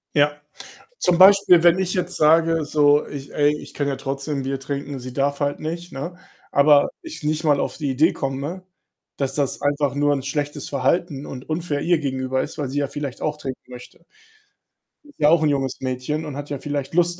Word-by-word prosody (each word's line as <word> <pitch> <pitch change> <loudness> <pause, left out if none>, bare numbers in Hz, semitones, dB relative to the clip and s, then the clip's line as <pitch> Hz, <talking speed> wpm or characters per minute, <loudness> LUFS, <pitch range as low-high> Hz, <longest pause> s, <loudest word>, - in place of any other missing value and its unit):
Ja. 145 0 +2 0.6
Zum 180 -2 +2
Beispiel, 190 -2 +7
wenn 175 +1 +5
ich 185 -1 -1
jetzt 180 0 -2
sage, 165 +1 +4
so 145 0 +3
„Ich 140 -1 -8
ey, 145 0 +3
ich - - -12
kann 145 - -1
ja 140 - -1
trotzdem 140 +1 -3
'n 135 - -2
Bier 135 +1 -3
trinken, 140 +1 -5
sie 130 0 -8
darf 140 +2 -1
halt 145 0 -1
nicht.“, 170 +3 -5
ne, 170 +6 -6 0.3
aber 145 0 +5
ich 325 - -8
nicht 155 +2 -1
mal 145 -2 +3
auf - - -3
die 145 -4 -2
Idee 150 +6 +3
komme, 140 +7 -4 0.6
dass 135 -2 -1
das 140 -2 -1
einfach 145 -2 0
nur 145 0 +2
'n 135 - -3
schlechtes 145 +1 -3
Verhalten 140 +2 -1
und 130 -1 -9
unfair 155 -2 -2
ihr 175 0 +2
gegenüber 130 -2 -1
ist, - - -7
weil 145 -3 -2
sie 140 +3 -3
ja 140 - -1
vielleicht 140 -3 -6
auch 150 -1 -1
trinken 135 -3 -6
möchte. 125 +6 -12 1.0
Sie 295 - -19
ist 290 - -21
ja 150 - +5
auch 165 0 +4
'n 155 - +3
junges 135 -3 -1
Mädchen 130 +5 -3
und 150 -3 -6
hat 145 0 -7
ja 145 -2 -4
vielleicht 145 0 -4
Lust 175 0 +2
145 Hz, 215 wpm, -22 LUFS, 135-160 Hz, 1.0 s, Beispiel